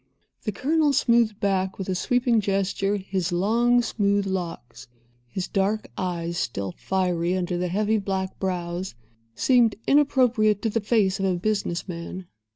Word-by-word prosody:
The 210 - 0
Colonel 295 +6 +1
smoothed 235 -5 +3
back, 190 -1 0
with 190 - -5
a 190 - 0
sweeping 240 +4 +2
gesture, 195 0 0
his 190 -2 -2
long, 235 +7 +3
smooth, 200 -3 +1
locks. 175 -11 -5 0.4
His 180 +9 -4
dark 205 +2 -1
eyes, 170 -2 -3
still 100 -5 -3
fiery 180 -1 0
under 180 -1 -2
the 180 +1 -1
heavy 210 +4 +1
black 190 -1 -3
brows, 180 -3 -3 0.4
seemed 240 - +3
inappropriate 250 -7 +3
to 225 - 0
the 230 - 0
face 205 -3 +1
of 195 - 0
a 185 -1 +1
business 200 -2 -2
man. 180 +1 -6
195 Hz, 150 wpm, -25 LUFS, 180-220 Hz, 0.4 s, smoothed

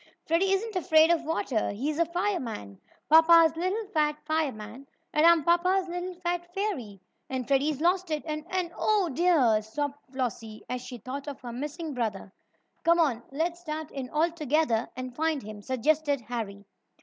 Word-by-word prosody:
"Freddie 345 +4 +2
isn't 410 +2 0
afraid 320 -2 +5
of 330 -1 +2
water 290 -8 -1
he's 290 +9 -2
a 335 - +4
fireman 330 - -3 0.3
papa's 325 0 +7
little 375 +6 -1
fat 300 -5 +1
fireman, 270 -5 -3 0.3
and 305 +2 +5
I'm 340 -2 +6
papa's 360 +3 +2
little 355 +1 -4
fat 350 0 -3
fairy, 270 - -3 0.3
and 260 -2 -3
Freddie's 280 +1 +1
losted 350 -3 +1
and 305 -1 -4
and 365 -2 -1
oh, 415 -5 +2
dear!" 280 -8 +3
sobbed 285 +6 -4
Flossie, 230 -4 -4
as 250 0 -3
she 250 0 -8
thought 265 +5 -7
of 285 -2 -6
her 240 -2 -7
missing 300 +5 -5
brother. 210 -5 -3 0.5
"Come 335 +1 +4
on, 270 -8 +2
let's 330 +5 -2
start 315 -2 -5
in 265 -2 -5
all 320 +4 +1
together 300 -7 0
and 255 -1 -6
find 315 -3 0
him," 210 0 -9
suggested 285 +4 +1
Harry. 215 -4 -5
305 Hz, 160 wpm, -28 LUFS, 250-340 Hz, 0.5 s, papa's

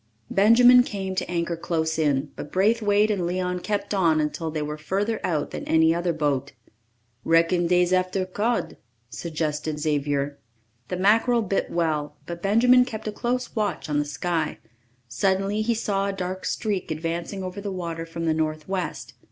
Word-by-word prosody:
Benjamin 245 +5 +7
came 195 -5 -4
to 185 -1 -3
anchor 170 -1 -1
close 160 -1 -1
in, 145 -2 +1
but 145 - -8
Braithwaite 210 +1 +3
and 195 -4 -1
Leon 180 0 -1
kept 205 +2 -2
on 165 -5 +3
until 155 +2 -2
they 155 -1 -3
were 150 0 -4
further 205 +7 -1
out 155 -5 -1
than - - -5
any 160 0 +4
other 175 +1 0
boat. 145 -4 -1 0.7
"Reckon 170 +1 +3
dey's 180 +1 +3
after 185 +1 +1
cod," 215 +6 -1 0.3
suggested 155 -1 -3
Xavier. 145 -2 -1 0.5
The 180 - -3
mackerel 225 +5 +3
bit 195 -1 -1
well, 150 -3 -1
but 170 0 -7
Benjamin 245 +6 +5
kept 220 -4 -6
a - - -1
close 245 +3 -2
watch 210 -5 -1
on 145 0 +1
the 145 - 0
sky. 160 +1 -2 0.5
Suddenly 195 - 0
he 230 +2 +1
saw 200 -3 -1
a 200 - -2
dark 185 0 -4
streak 205 -5 -2
advancing 170 +4 -3
over 185 +2 -5
the 200 -1 -4
water 170 -3 -4
from 165 0 -5
the 160 - +2
northwest. 155 - -3
180 Hz, 165 wpm, -25 LUFS, 160-200 Hz, 0.7 s, Benjamin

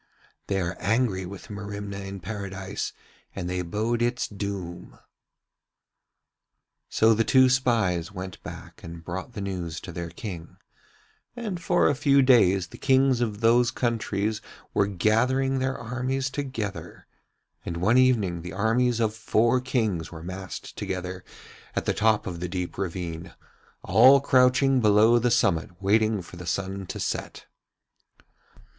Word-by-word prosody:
They 100 -1 0
are 85 -1 -2
angry 100 -3 0
with 100 +2 -10
Merimna 100 -1 -6
in 95 -1 -7
Paradise 100 -2 -5 0.4
and 90 -3 -4
they 90 0 -2
bode 110 +7 -1
its 120 +1 0
doom.' 100 -4 -6 1.9
So 110 +1 +4
the 115 +1 +2
two 130 +2 +5
spies 115 -10 +1
went 95 -2 -7
back - - -10
and 85 0 -9
brought 95 +7 -5
the 105 - -5
news 90 -4 -4
to 90 - -8
their 85 0 -5
King, 85 -1 -8 0.8
and 210 -8 -4
for - - +3
a - - +3
few 140 -1 +4
days 95 -9 +4
the - - -12
Kings 130 -2 +3
of 110 -2 -2
those 120 +1 +4
countries 110 -3 -1 0.3
were 100 - +2
gathering 125 +8 +1
their 130 0 -1
armies 130 +3 -2
together; 105 - -5 0.6
and 85 - -4
one 105 +9 +3
evening 105 -10 +2
the 90 - -7
armies 115 +2 +1
of 110 -2 +1
four 115 +2 +2
Kings 110 - -1
were 80 -1 -9
massed 95 +1 -7
together 90 0 -4 0.5
at - - -1
the - - +1
top 110 -1 +2
of 90 -3 -5
the 90 0 -4
deep 90 -1 -4
ravine, 85 -3 -5 0.5
all 135 +2 +7
crouching 130 0 +4
below 110 +2 +5
the 120 +1 +1
summit 95 -7 +1
waiting 105 0 +2
for 90 - -12
the 90 -1 -8
sun 95 +2 -3
to - - -6
set. - - -4
105 Hz, 145 wpm, -26 LUFS, 90-120 Hz, 1.9 s, all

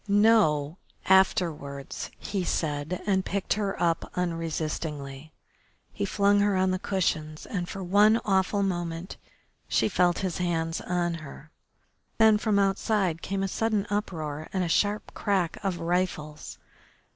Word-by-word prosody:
"No, 200 -7 +3 0.3
afterwards," 165 -7 +1
he 195 -3 -3
said, 155 +1 -2
and 190 -2 +2
picked 195 0 -1
her 205 -2 -2
up 170 -1 0
unresistingly. 155 -4 -3 0.6
He 100 - -2
flung 200 - +3
her 205 -1 +2
on 185 0 +2
the 185 - -1
cushions 155 -6 -1
and 180 -3 -4
for 195 - -5
one 205 +5 +5
awful 195 0 +2
moment 175 -1 -3 0.5
she - - +2
felt 180 -4 +2
his 180 -2 -3
hands 165 -2 -1
on 175 -1 -1
her. 150 +1 -11 0.7
Then 220 -1 +6
from 215 -2 +1
outside 195 -3 +1
came 195 0 -2
a - - 0
sudden 215 0 0
uproar 155 -7 -3
and 190 -1 0
the 170 - -2
sharp 205 +5 0
crack 190 -4 0
of 190 -3 -1
rifles. 165 -3 -2
180 Hz, 135 wpm, -27 LUFS, 160-200 Hz, 0.7 s, Then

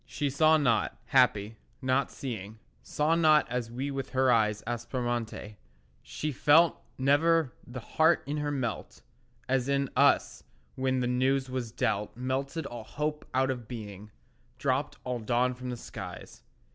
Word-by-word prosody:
She 140 +3 -2
saw 155 +3 +5
not—happy, 115 -3 +1 0.2
not 130 +1 +1
seeing— 110 -5 -6 0.2
Saw 150 +2 0
not 155 -2 +4
as 125 -2 -2
we 130 +4 -4
with 135 -1 -4
her 130 -1 +3
eyes 105 -2 +2
Aspromonte; 120 -3 -3 0.4
she 155 - -4
felt 155 +5 +4 0.2
Never 145 +1 +3
the 125 0 -7
heart 160 +8 +2
in 145 +2 -3
her 150 0 -1
melt 130 -5 -4 0.4
As 130 0 0
in 140 -1 0
us - - +3 0.3
when 130 -1 0
the - - 0
news 130 +1 +1
was 125 -3 -3
dealt 105 0 -1
Melted 135 +5 -2
all 120 -4 -7
hope 150 +5 -4
out 130 0 +2
of 120 -4 -6
being, 105 -3 -8 0.5
Dropped - - -1
all 125 -1 -3
dawn 120 +3 +1
from 125 0 -7
the 125 - -4
skies. - - -9
130 Hz, 145 wpm, -29 LUFS, 120-140 Hz, 0.5 s, saw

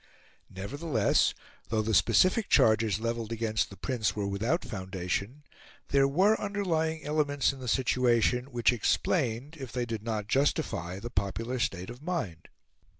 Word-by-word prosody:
Nevertheless, 120 - 0 0.3
though 110 -1 +1
the 110 +1 -1
specific 185 - +4
charges 110 -2 +4
levelled 115 -1 -3
against 110 -2 -1
the 100 - -12
Prince 115 +1 -1
were 105 -1 -2
without 110 - -1
foundation, 95 +7 -4 0.5
there 140 -1 +4
were 190 +10 +3
underlying 165 -6 -1
elements 145 -2 +1
in 135 - -11
the 125 - -7
situation 125 0 +2
which 120 -3 +2
explained, 130 - 0
if 130 -4 -7
they 125 -1 -2
did 115 -2 -4
not 110 -2 -3
justify, 110 - 0
the 120 +4 -7
popular 115 +6 -2
state 95 -2 -2
of 120 +2 -11
mind. 115 - -4
120 Hz, 145 wpm, -29 LUFS, 105-145 Hz, 0.5 s, specific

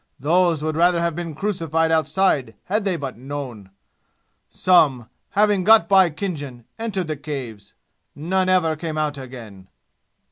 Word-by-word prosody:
Those 165 +2 +2
would 155 0 -2
rather 175 +1 +3
have 170 0 0
been 170 -3 -5
crucified 165 -4 -1
outside 155 -6 +1
had 210 +2 -1
they 190 -3 0
but 135 -6 -6
known. 130 -7 -7 0.8
Some, 150 -10 +3 0.3
having 205 -2 +3
got 220 +3 +6
by 190 -3 +5
Khinjan, 145 - -6
entered 205 -5 -2
the 155 -1 -3
Caves. 130 -9 -8 0.4
None 185 +5 0
ever 170 -4 +2
came 155 0 -5
out 150 -2 -2
again!" 115 -8 -11
160 Hz, 140 wpm, -22 LUFS, 135-185 Hz, 0.8 s, got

